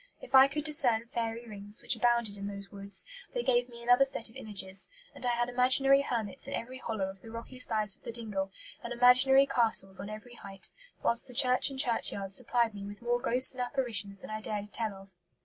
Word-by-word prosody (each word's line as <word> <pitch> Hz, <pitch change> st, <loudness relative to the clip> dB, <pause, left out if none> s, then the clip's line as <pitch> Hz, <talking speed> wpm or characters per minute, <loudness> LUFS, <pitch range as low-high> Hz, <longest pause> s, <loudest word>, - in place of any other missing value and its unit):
If -, -, -13 dB
I 265 Hz, 0 st, +9 dB
could 295 Hz, +2 st, -4 dB
discern 265 Hz, -7 st, +3 dB
fairy 230 Hz, 0 st, -3 dB
rings, 205 Hz, 0 st, -8 dB
which -, -, +3 dB
abounded 235 Hz, -2 st, +1 dB
in 200 Hz, 0 st, -6 dB
those 200 Hz, -1 st, -7 dB
woods, 200 Hz, 0 st, 0 dB, 0.3 s
they 485 Hz, -, -1 dB
gave 245 Hz, 0 st, +1 dB
me 235 Hz, -1 st, -11 dB
another 245 Hz, +3 st, +5 dB
set 265 Hz, -4 st, 0 dB
of -, -, -21 dB
images; 195 Hz, -6 st, +2 dB, 0.2 s
and -, -, -12 dB
I 240 Hz, -, +1 dB
had 240 Hz, 0 st, 0 dB
imaginary 260 Hz, +2 st, +3 dB
hermits 240 Hz, -1 st, -2 dB
in 275 Hz, -, -3 dB
every 255 Hz, +2 st, -6 dB
hollow 220 Hz, -6 st, -3 dB
of 190 Hz, 0 st, -10 dB
the 225 Hz, -, -12 dB
rocky 230 Hz, +3 st, -9 dB
sides 215 Hz, -5 st, 0 dB
of -, -, -26 dB
the -, -, -7 dB
dingle, 210 Hz, -4 st, -4 dB, 0.3 s
and 235 Hz, -, -6 dB
imaginary 255 Hz, +3 st, +5 dB
castles 225 Hz, -7 st, +2 dB
on 200 Hz, -, -6 dB
every 215 Hz, +3 st, -9 dB
height; 195 Hz, -4 st, -6 dB, 0.3 s
whilst 235 Hz, +2 st, 0 dB
the 250 Hz, -, -13 dB
church 255 Hz, +1 st, +4 dB
and 270 Hz, -, -8 dB
churchyard 225 Hz, -6 st, +1 dB
supplied 235 Hz, -1 st, 0 dB
me 200 Hz, -1 st, -8 dB
with 205 Hz, +3 st, -9 dB
more 240 Hz, 0 st, +1 dB
ghosts 255 Hz, 0 st, +3 dB
and 255 Hz, -, -6 dB
apparitions 220 Hz, -7 st, -2 dB
than -, -, -9 dB
I 215 Hz, 0 st, -4 dB
dared 205 Hz, -1 st, -4 dB
to 210 Hz, -, -19 dB
tell 220 Hz, -3 st, -3 dB
of." 195 Hz, 0 st, -15 dB
235 Hz, 220 wpm, -30 LUFS, 205-250 Hz, 0.3 s, I